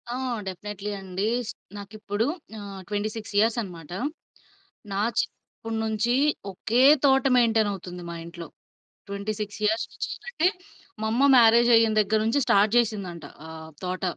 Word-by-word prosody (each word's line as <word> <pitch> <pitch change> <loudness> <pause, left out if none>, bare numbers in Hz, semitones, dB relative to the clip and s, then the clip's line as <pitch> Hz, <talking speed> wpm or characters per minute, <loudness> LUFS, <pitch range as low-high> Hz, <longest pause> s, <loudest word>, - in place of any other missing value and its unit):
ఆ! - - -3 0.3
డెఫినైట్లీ 205 +2 -5
అండి. 190 +2 -3 0.5
నాకిప్పుడు 205 +1 -3 0.3
ఆహ్, 200 -2 -8
26 210 +1 -4
ఇయర్స్ 225 +2 +2
అనమాట. 170 -7 -9 1.0
నా 195 - -1 0.2
చిన్నప్పుడు 225 0 -4
నుంచి 220 +2 0 0.4
ఒకే 225 +6 0 0.2
తోట 270 -1 +4
మెయింటైనవుతుంది 205 -7 +1
మా - - -5
ఇంట్లో. 170 0 -9 0.6
26 205 +1 -4
ఇయర్స్ 220 +2 +1
నుంచి - - -4 0.2
అంటే 350 -8 +1 0.5
మా 220 - 0
అమ్మ 245 +5 +2
మ్యారేజయిన 230 -1 +6
దగ్గర 215 +1 +1
నుంచి 230 +6 +2
స్టార్ట్ 205 +2 +4
జేసిందంట 200 -9 -1 0.2
ఆహ్, 160 0 -9
తోట, 185 +1 -3
210 Hz, 125 wpm, -25 LUFS, 195-225 Hz, 1.0 s, మ్యారేజయిన